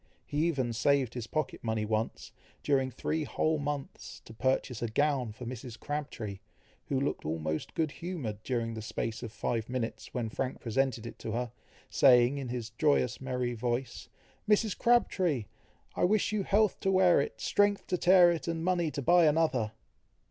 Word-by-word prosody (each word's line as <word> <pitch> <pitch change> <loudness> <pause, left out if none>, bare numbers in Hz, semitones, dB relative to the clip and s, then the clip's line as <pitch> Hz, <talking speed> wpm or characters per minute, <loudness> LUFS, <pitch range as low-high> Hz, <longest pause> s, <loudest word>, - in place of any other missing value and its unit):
He 150 +3 0
even 130 -8 -1
saved 135 +1 +2
his 120 -2 -5
pocket 155 +4 -3
money 110 -2 -1
once, 110 +1 -2 0.3
during 135 -2 +2
three 155 +5 -2
whole 155 +1 0
months, 145 -1 -5
to 110 - -11
purchase 130 0 0
a 120 - 0
gown 130 0 +1
for 115 +4 -9
Mrs. 120 -1 -7
Crabtree, 120 -10 -4 0.5
who 135 - 0
looked 140 - -2
almost 80 0 -3
good 160 -2 0
humoured 145 - -5
during 115 -2 -2
the 110 - -5
space 110 +1 -4
of 120 -3 -6
five 115 +1 -2
minutes, 125 -2 -4
when 120 -3 -2
Frank 130 +3 -3
presented 120 -1 -1
it 115 - -8
to 110 - -4
her, 120 0 -2 0.4
saying, 125 +1 +5
in 135 - -4
his 120 -2 -4
joyous 125 -2 +1
merry 125 -2 -2
voice, 120 +2 -3 0.4
"Mrs. 210 -1 +3
Crabtree! 185 - +2 0.5
I - - +2
wish 210 +2 +2
you 215 -1 0
health 205 +1 +2
to 195 - 0
wear 185 -5 +5
it, 110 -5 -5
strength 205 - +2
to 180 - -1
tear 180 -1 +7
it, 170 0 -3
and 165 0 -2
money 175 -3 +1
to 140 -2 -4
buy 175 +3 +5
another!" 145 -8 +1
130 Hz, 175 wpm, -30 LUFS, 115-160 Hz, 0.5 s, tear